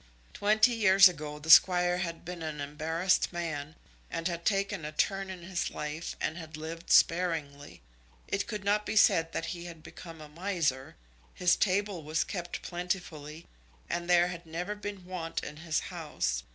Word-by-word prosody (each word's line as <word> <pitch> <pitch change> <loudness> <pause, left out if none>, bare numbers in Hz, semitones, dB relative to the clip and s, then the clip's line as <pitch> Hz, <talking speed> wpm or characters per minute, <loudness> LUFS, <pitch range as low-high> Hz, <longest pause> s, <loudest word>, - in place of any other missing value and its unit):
Twenty 215 +3 +3
years 195 -3 +7
ago 150 -4 -5
the 160 +2 0
Squire 180 +1 +6
had 170 -2 -4
been 175 0 -6
an 155 -2 -5
embarrassed 160 +5 0
man, 160 -3 -4 0.3
and 165 - -2
had 170 -1 -4
taken 195 -5 0
a 150 - -4
turn 195 +4 0
in 185 -2 -8
his 175 0 -2
life 150 +2 -5
and 160 +3 -2
had 160 -1 -9
lived 165 +2 -7
sparingly. 160 -5 +2 0.4
It 195 - -1
could 210 -3 -5
not 205 +1 +2
be 215 - -4
said 165 -5 +4
that 165 - -2
he 170 -1 -8
had 165 -3 -10
become 165 -2 -11
a 155 - -10
miser. 160 -5 -2 0.4
His 180 -1 +3
table 200 -2 0
was 155 +2 0
kept 175 -3 -5
plentifully, 175 -3 -5 0.4
and 175 0 -3
there 175 0 +5
had 175 -1 -8
never 175 +5 -3
been 205 -3 -7
want 175 -3 -4
in 150 - -7
his 160 -1 -1
house. 150 - -2
170 Hz, 170 wpm, -30 LUFS, 155-185 Hz, 0.4 s, years